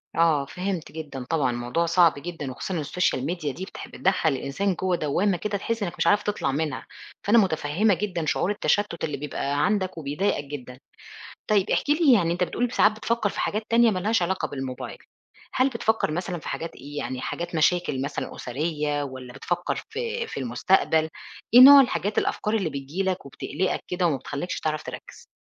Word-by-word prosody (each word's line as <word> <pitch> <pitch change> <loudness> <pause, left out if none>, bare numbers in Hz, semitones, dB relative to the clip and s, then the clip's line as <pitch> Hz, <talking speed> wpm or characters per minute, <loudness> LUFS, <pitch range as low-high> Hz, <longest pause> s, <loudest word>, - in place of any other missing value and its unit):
آه، 160 -4 +3
فهمت 180 +1 -4
جدًا 145 -5 -7
طبعًا 145 -7 +1
الموضوع 120 +8 -1
صعب 170 -1 +5
جدًا، 150 -4 -5
وخصوصًا 175 +6 -4
السوشيال 145 -3 0
ميديا 155 -3 -2
دي 190 - -6
بتح - - -9
بتدخل 185 -4 +1
الإنسان 140 +9 -1
جوه 185 +1 0
دوامة 175 +5 +1
كده 205 +1 -2
تحس 225 +1 -2
إنك 175 - -3
مش - - +1
عارف 205 0 +4
تطلع 205 -9 -1
منها، 145 -4 -2 0.4
فأنا 220 +3 +4
متفهمة 185 +1 +2
جدًا 180 -3 -2
شعور 180 +5 +1
التشتت 205 -3 0
اللي 150 -3 -2
بيبقى 145 0 -1
عندك 190 -3 0
وبيضايقك 150 +3 -1
جدًا، 130 -3 -8 0.7
طيب 205 -2 +3
احكِ - - 0
لي 300 -3 +5
يعني 170 -6 +3
أنت 180 - 0
بتقول 245 +7 -1
ب - - -11
ساعات 215 - +4
بتفكر 215 0 -1
في - - -6
حاجات 215 +1 -1
تانية 230 -1 +5
مالهاش 210 +3 +1
علاقة 185 +2 0
بالموبايل. 135 -2 -6 0.6
هل 260 +2 +3
بتفكر 220 -8 0
مثلًا 175 +1 -3
في - - -10
حاجات 165 - -5
إيه 145 +2 -9
يعني 130 -3 -3
حاجات 170 0 -4
مشاكل 160 -4 +2
مثلًا 140 +1 -4
أسرية؟ 150 +2 -2
والّا 130 -2 -8
بتفكر 175 +6 -2
في 470 0 -3
في - - -6
المستقبل؟ 160 +5 +2 0.4
إيه 245 - +10
نوع 280 +1 +11
الحاجات 210 -5 -1
الأفكار 210 - 0
اللي 190 -7 0
بتيجي 140 +7 -4
لك 190 -4 -2
وبتقلقك 150 +6 -2
كده 180 -1 +1
وما 145 -4 0
بتخليكش 145 +7 -4
تعرف 155 -1 -2
تركز؟ - - -10
170 Hz, 180 wpm, -25 LUFS, 145-200 Hz, 0.7 s, نوع